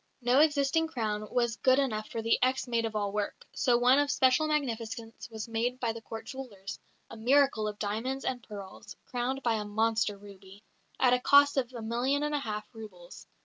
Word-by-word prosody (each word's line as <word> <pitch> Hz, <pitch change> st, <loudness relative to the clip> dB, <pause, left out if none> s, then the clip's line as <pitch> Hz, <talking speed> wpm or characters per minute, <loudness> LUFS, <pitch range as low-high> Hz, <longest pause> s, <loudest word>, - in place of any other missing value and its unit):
No 245 Hz, +3 st, +4 dB
existing 300 Hz, +1 st, +3 dB
crown 215 Hz, -7 st, -3 dB
was 235 Hz, -2 st, 0 dB
good 260 Hz, +3 st, +4 dB
enough 220 Hz, -6 st, -1 dB
for 225 Hz, -, -4 dB
the 230 Hz, -, +2 dB
ex 260 Hz, +1 st, +1 dB
maid 230 Hz, -1 st, 0 dB
of 220 Hz, -1 st, -4 dB
all 205 Hz, -1 st, -1 dB
work, 210 Hz, 0 st, -4 dB
so 245 Hz, -2 st, +2 dB
one 250 Hz, +3 st, +5 dB
of 290 Hz, 0 st, +1 dB
special 265 Hz, +2 st, +3 dB
magnificence 230 Hz, -6 st, -3 dB
was 220 Hz, -1 st, -6 dB
made 235 Hz, +3 st, -1 dB
by 235 Hz, -3 st, -1 dB
the 230 Hz, -, -9 dB
Court 225 Hz, 0 st, -8 dB
jewellers 215 Hz, -8 st, -8 dB, 0.3 s
a -, -, -8 dB
miracle 245 Hz, -1 st, +3 dB
of 210 Hz, -1 st, -5 dB
diamonds 225 Hz, +7 st, -3 dB
and 250 Hz, -1 st, -2 dB
pearls, 200 Hz, -4 st, -10 dB
crowned 255 Hz, +2 st, -3 dB
by 235 Hz, -, +2 dB
a -, -, -3 dB
monster 215 Hz, 0 st, 0 dB
ruby 200 Hz, 0 st, -14 dB, 0.4 s
at 250 Hz, -1 st, +4 dB
a 250 Hz, -, +3 dB
cost 285 Hz, +2 st, +5 dB
of 255 Hz, -3 st, 0 dB
a 235 Hz, -3 st, -7 dB
million 250 Hz, +6 st, 0 dB
and 295 Hz, 0 st, -1 dB
a 295 Hz, -, +1 dB
half 215 Hz, -4 st, -5 dB
roubles. 190 Hz, -6 st, -11 dB
235 Hz, 200 wpm, -30 LUFS, 215-265 Hz, 0.4 s, one